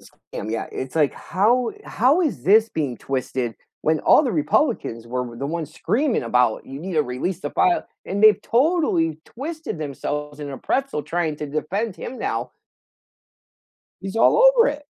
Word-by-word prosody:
Scam, 105 - -9
yeah, 115 0 -2
it's, 130 +3 -5
like, 150 -3 +3
how 230 +6 +1
how 265 - +2
is 230 - -1
this 215 +5 +5
being 145 - -2
twisted? 130 -2 -3 0.3
When 155 -1 +2
all - - +6
the 255 -6 -1
Republicans 150 - 0
were 125 +1 -2
w 120 -2 -8
the 140 - -3
ones 160 0 -4
screaming 260 - 0
about, 120 -1 +1
"You 135 +1 -8
need 185 +2 -5
to 155 - +3
release 145 +8 -3
the - - -4
file," 365 -3 +2 0.2
and 200 +2 -2
they've 215 -1 +7
totally 235 - +1
twisted 305 - -6
themselves 150 0 -4
in 145 -1 -5
a 135 - -7
pretzel 270 - -1
trying 165 -2 -2
to 150 - -5
defend 180 +9 -2
him 255 - -7
now. - - -2 1.5
He's 195 +2 -6
all 225 - +5 0.2
over 470 +1 +6
it. 295 0 -5
165 Hz, 170 wpm, -22 LUFS, -, 1.5 s, they've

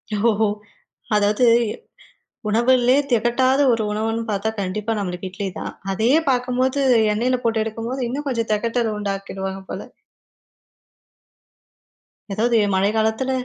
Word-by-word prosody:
ஓ! 220 0 +2 0.7
அதாவது 210 +3 +3 1.0
உணவுலயே 245 +3 +3 0.2
தெகட்டாத 245 +4 +2
ஒரு 230 -1 0
உணவுன்னு 225 +2 -1
பாத்தா 205 +2 -1
கண்டிப்பா 205 +4 -2
நம்மளுக்கு 185 -1 -4
இட்லி 195 +1 -4
தான். - - -5 0.2
அதையே 225 +10 +3
பாக்கும்போது 255 +2 0 0.3
எண்ணெயில 250 +4 +1
போட்டு 225 -1 +1
எடுக்கும்போது, 230 +4 -4
இன்னும் 285 +4 -4
கொஞ்சம் 230 -4 -2
தெகட்டல 230 +1 -1
உண்டாக்கிடுவாங்க 195 -1 -4
போல. - - -4 2.5
எதாவது 230 +3 +2 0.2
மழை 195 +2 +2
காலத்தில 220 +4 0
225 Hz, 105 wpm, -21 LUFS, 205-245 Hz, 2.5 s, அதாவது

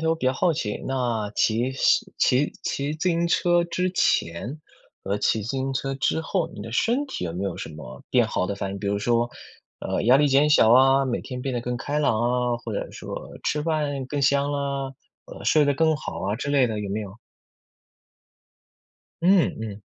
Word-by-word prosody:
头， 160 0 +1
我 - - +3
比 130 - -2
较 130 - +3
好 170 +6 +2
奇， 105 -9 -3
那 120 -5 -1
骑 115 +3 +2 0.5
骑 135 +4 +2
骑 140 +1 -2
自 160 +4 -1
行 170 0 +1
车 175 0 +3
之 180 +2 -1
前 120 - 0 0.4
和 100 +2 -1
骑 110 +1 +1
自 105 - -6
行 135 0 -2
车 135 +1 -2
之 135 +4 0
后， 165 +1 -1
你 - - -9
的 115 - -8
身 245 - +1
体 270 - -5
有 85 - -3
没 90 +3 -3
有 100 - -3
什 - - -6
么 75 -1 -10
变 - - +4
好 90 - -1
的 100 - -2
反 100 -1 -4
应？ 100 - -5
比 100 - -5
如 100 +1 0
说， 120 +2 +1 0.5
呃， - - -2
压 120 +5 +6
力 150 +1 +4
减 140 +2 +4
小 115 -6 +6
啊， 135 +2 +5
每 125 -3 -1
天 125 -2 -6
变 135 -1 -2
得 120 - -1
更 120 +1 -3
开 145 +4 -2
朗 125 -7 +2
啊， 120 0 +1
或 120 -1 -7
者 100 - -4
说 - - -8
吃 150 - 0
饭 150 -4 -1
更 145 +2 -3
香 140 +1 +2
啊， 140 -1 -2 0.4
呃， - - -10
睡 155 -1 +4
得 145 0 +2
更 160 +2 +3
好 135 - -6
啊 100 +2 -1
之 125 +5 -4
类 140 -3 +4
的 110 -2 -3
有 100 -1 -4
没 105 +2 -2
有？ 100 -2 -6 2.1
嗯， 180 -2 +4
嗯。 105 -2 -6
135 Hz, 225 characters per minute, -24 LUFS, 110-150 Hz, 2.1 s, 压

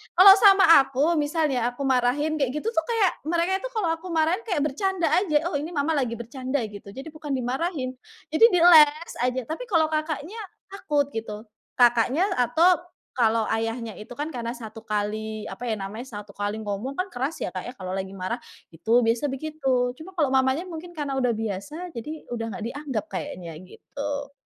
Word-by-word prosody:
kalau 385 +2 +10
sama 390 -3 +7 0.2
aku 275 +5 +1
misalnya 290 -5 0
aku 260 +3 -6
marahin 265 +5 +1
kayak 265 -3 +1
gitu 300 +9 -3
tuh 325 - +1
kayak 445 -6 +2 0.2
mereka 345 +3 +1
itu - - -3
kalau 380 -7 +1
aku 350 +3 -11
marahin 325 +4 +2
kayak 360 -8 0
bercanda 345 +4 0
aja, 325 -4 +2
"Oh - - -3
ini 315 +4 -5
Mama 300 +2 +1
lagi 245 -4 -1
bercanda 260 +3 -3
gitu," 205 -1 -11
jadi 270 +4 -8
bukan 305 -2 -7
dimarahin. 260 +1 -2 0.4
Jadi 315 +9 +6
di 355 - +4
eles 315 -1 +7
aja, 255 +1 0
tapi 320 +10 -4
kalau 325 -6 +3
kakaknya, 310 +6 -3 0.3
takut 295 -7 0
gitu. 220 0 -6 0.3
Kakaknya 245 - +4
atau 330 +9 +4 0.4
kalau 225 -1 +3
ayahnya 225 0 -2
itu 215 - -9
kan 300 +2 -4
karena 235 -2 -4
1 225 -2 -9
kali 215 +1 -2
apa 245 0 -6
ya 220 - 0
namanya 215 +5 -6
1 205 -3 -9
kali 205 +1 -3
ngomong 210 +7 -4
kan 370 +1 -2
keras 270 +6 -3
ya, - - -3
Kak, 185 - -5
ya 245 - -7
kalau 185 -4 -6
lagi 190 0 -4
marah. 190 +6 -3 0.3
Itu 230 +9 +2
biasa 230 +5 +1
begitu 270 -3 -1
cuma 350 +4 -10
kalau 295 -6 +1
mamanya 265 +4 +2
mungkin 345 0 -8
karena 280 -3 -2
udah 250 -2 +2
biasa 225 - -5
jadi 305 +7 -7
udah 230 -1 -3
enggak 230 -2 -5
dianggep 270 -7 -4
kayaknya 180 -2 -5 0.2
gitu. 285 +7 -6
270 Hz, 185 wpm, -25 LUFS, 230-320 Hz, 0.4 s, kalau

